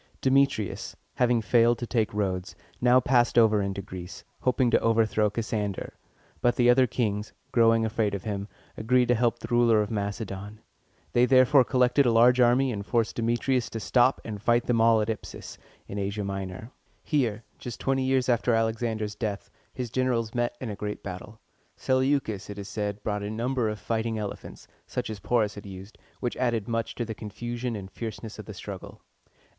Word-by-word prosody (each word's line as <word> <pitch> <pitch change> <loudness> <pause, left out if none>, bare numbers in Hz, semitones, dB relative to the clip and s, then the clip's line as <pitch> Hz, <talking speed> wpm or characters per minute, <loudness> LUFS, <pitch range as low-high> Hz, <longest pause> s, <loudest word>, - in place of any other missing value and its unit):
Demetrius, 130 -6 +1 0.2
having 120 -2 +2
failed 120 +1 +4
to 120 - -4
take 115 -3 0
Rhodes, 95 -3 -2 0.3
now 125 +1 +6
passed 125 -1 +2
over 110 -3 +5
into 100 0 -3
Greece, 90 -1 -9 0.2
hoping 125 -1 +2
to - - +5
overthrow 110 -2 +2
Cassander; 105 -2 -3 0.5
but 120 - +3
the 120 0 +5
other 130 +1 +4
kings, 105 -3 -2 0.2
growing 115 -2 +4
afraid 110 -2 0
of 95 - -6
him, 100 -2 -3 0.3
agreed 125 +2 +2
to - - +6
help 120 0 +1
the - - -8
ruler 120 -2 +4
of 105 0 -1
Macedon. 100 0 -4 0.5
They 120 +1 +4
therefore 130 +1 +6
collected 125 +1 +3
a - - +4
large 120 +2 +5
army, 125 +2 +4
and 100 -3 -4
forced 115 +1 0
Demetrius 120 +2 0
to 115 - -5
stop 125 +4 +3
and 105 -3 -6
fight 120 +2 +3
them 115 -2 +2
all 115 -1 +5
at 105 - -1
Ip´sus, 110 -1 -6 0.3
in 100 - -5
Asia 100 +1 -2
Minor. 95 +3 -5 0.3
Here, 120 -7 0 0.2
just 120 -2 -7
twenty 135 0 0
years 130 -1 +1
after 120 -1 +2
Alexander's 110 -1 -1
death, 105 -2 -4 0.2
his 125 -3 -5
generals 120 -3 0
met 120 0 -1
in 120 -4 -4
a - - -5
great 105 0 -5
battle. 100 +4 -8 0.4
Seleucus, 130 -7 0
it 105 - -7
is 100 -1 -6
said, 105 0 -4
brought 105 -1 -2
a 100 - -4
number 120 +1 -1
of 105 - -4
fighting 110 +2 -2
elephants, 105 -2 -7 0.2
such - - -3
as 105 - -6
Porus 110 0 +1
had 100 -1 -10
used, 95 +2 -10 0.2
which 120 - -2
added 120 -4 0
much 115 -1 -2
to 120 - -2
the 110 - -5
confusion 120 +4 -5
and 95 -2 -7
fierceness 110 -1 -7
of - - -9
the - - -8
struggle. - - -8
115 Hz, 185 wpm, -27 LUFS, 105-120 Hz, 0.5 s, now